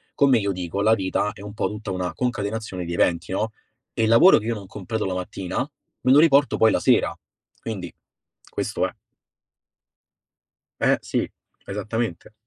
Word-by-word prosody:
come 135 -3 +5
io 100 -1 -1
dico, 90 +1 -3
la 110 +2 +5
vita 95 +1 -1
è - - -13
un 105 0 -8
po' - - -1
tutta 105 -2 -6
una 90 -2 -2
concatenazione 105 -5 -3
di 85 - -4
eventi, 85 +1 +1
no, 110 +3 -1 0.4
e 115 - 0
il 110 - +3
lavoro 115 +12 +8
che 110 - -9
io 115 0 -1
non 100 -2 -8
completo 105 +3 -4
la 95 - -1
mattina, 90 0 -5 0.4
me 130 - +3
lo 140 - +7
riporto 145 -3 +4
poi 110 - +5
la - - +2
sera, - - +3 0.5
quindi 95 -6 -5 0.6
questo - - -1
è. - - -12 1.9
Eh-eh, - - +4
sì, - - -2 0.4
esattamente. 105 0 -3
105 Hz, 170 wpm, -23 LUFS, 95-115 Hz, 1.9 s, lavoro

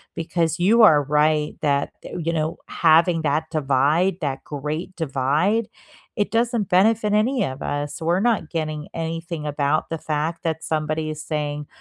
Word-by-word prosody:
because 165 0 -1
you 215 +7 +4
are 150 -8 +7
right 150 +1 +1
that, 140 -2 +1
th - - -9
you 165 - +1
know, 160 -1 -2
having 165 +1 +3
that 150 +1 0
divide, 155 +5 +2
that 135 -3 -3
great 155 +6 -5
divide, 160 - 0 0.5
it 205 - 0
doesn't 230 -2 +1
benefit 210 +3 +3
any 245 +5 +2
of 130 +1 -6
us. 145 +3 -3
We're 170 +3 +1
not 220 -8 +1
getting 155 -2 -3
anything 165 -1 -4
about 145 +1 0
the 165 - -3
fact 155 +2 -3
that 160 -1 -2
somebody 155 0 -2
is 155 0 -6
saying 150 -2 -3
160 Hz, 160 wpm, -22 LUFS, 150-175 Hz, 0.5 s, are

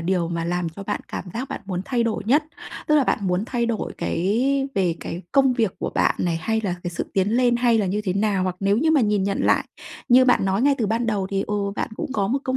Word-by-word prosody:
điều 175 0 0
mà 170 -1 -2
làm 175 0 -1
cho 165 +5 -9
bạn 205 +1 -3
cảm - - -5
giác 255 +3 -4
bạn - - -5
muốn 185 -2 -3
thay 245 -3 0
đổi 230 -2 -1
nhất? 290 +7 +3 0.4
Tức 305 - +3
là 290 -3 +4
bạn - - +1
muốn 185 +1 0
thay 235 -2 -1
đổi 230 -2 -2
cái 260 +10 0
về 180 -4 +1
cái 175 +3 -6
công 270 -2 +4
việc 225 -6 0
của - - -3
bạn - - +3
này, 170 -2 0
hay 220 +6 -1
là 180 -3 0
cái 175 - -3
sự 170 - -4
tiến 195 +1 +1
lên, 240 +1 +3
hay 240 -2 +3
là 200 - +1
như 200 +3 -1
thế 185 - 0
nào? 200 -1 +1
Hoặc 185 -1 -2
nếu 200 +1 +2
như 315 +3 +2
mà 305 - +4
nhìn 210 -4 +2
nhận 200 0 -1
lại, - - +3 0.4
như 255 +1 +7
bạn 250 - +3
nói 195 +4 +1
ngay 285 0 +4
từ 220 - +1
ban 230 +3 0
đầu 205 -3 0
thì, 195 0 0
ừ, 210 - -2 0.2
bạn - - -2
cũng 265 - -4
có 200 -5 0
một 265 - +1
công 260 0 0
210 Hz, 275 wpm, -23 LUFS, 185-245 Hz, 0.4 s, như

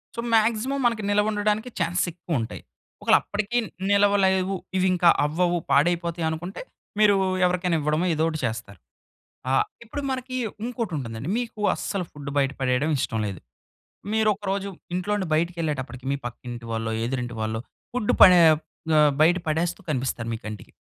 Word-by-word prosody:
So, 235 - -6
maximum 230 +5 +2
మనకి 230 -3 +1
నిల్వ 210 +1 +3
ఉండడానికి 210 +3 0
ఛాన్సెస్ 175 +1 +1
ఎక్కువ 165 -4 -3
ఉంటాయి. 115 - -5 0.4
ఒకవేళ - - +5
అప్పటికి 215 +3 -2
న్ - - -9 0.2
నిలవలేవు, 195 -2 +3 0.2
ఇవి 185 0 +3
ఇంకా 175 -1 +4 0.2
అవ్వవు, 175 +3 +1
పాడైపోతాయి 170 +2 +2
అనుకుంటే 175 +4 -5 0.4
మీరు 210 -1 +6 0.3
ఎవరికైనా 180 -1 +1
ఇవ్వడమో 155 +4 +1
ఏదోకటి 160 0 0
చేస్తారు. 110 -5 -5 0.7
ఆహ్, 135 - +4 0.2
ఇప్పుడు 285 +6 -5
మనకి 255 0 -3 0.3
ఇంకోటుంటుందండి. 155 - -4
మీకు 230 -3 -5
అస్సలు 195 -3 -3
ఫుడ్ 145 -1 -7
బయట 140 -1 +2
పడేయడం 130 +4 +1
ఇష్టం 115 -2 -1
లేదు. 95 -5 -5 0.7
మీరొకరోజు 200 -2 0 0.2
ఇంట్లో 185 +3 -2
నుండి 190 -3 -2
బయటికెళ్ళేటప్పటికి 155 -6 -2
మీ - - +1
పక్కింటి 120 0 -7
వాళ్ళో, 115 0 -2
ఎదురింటి 125 -1 -3
వాళ్ళో 110 0 -2 0.3
ఫుడ్ 245 -4 +1
పడే 180 -2 +9 0.6
ఆహ్, 150 -1 +5
బయట 170 +3 +6
పడేస్తూ 170 +4 -1
కనిపిస్తారు 125 -4 -2
మీ - - -8
కంటికి. 105 -2 -8
175 Hz, 145 wpm, -25 LUFS, 135-205 Hz, 0.7 s, పడే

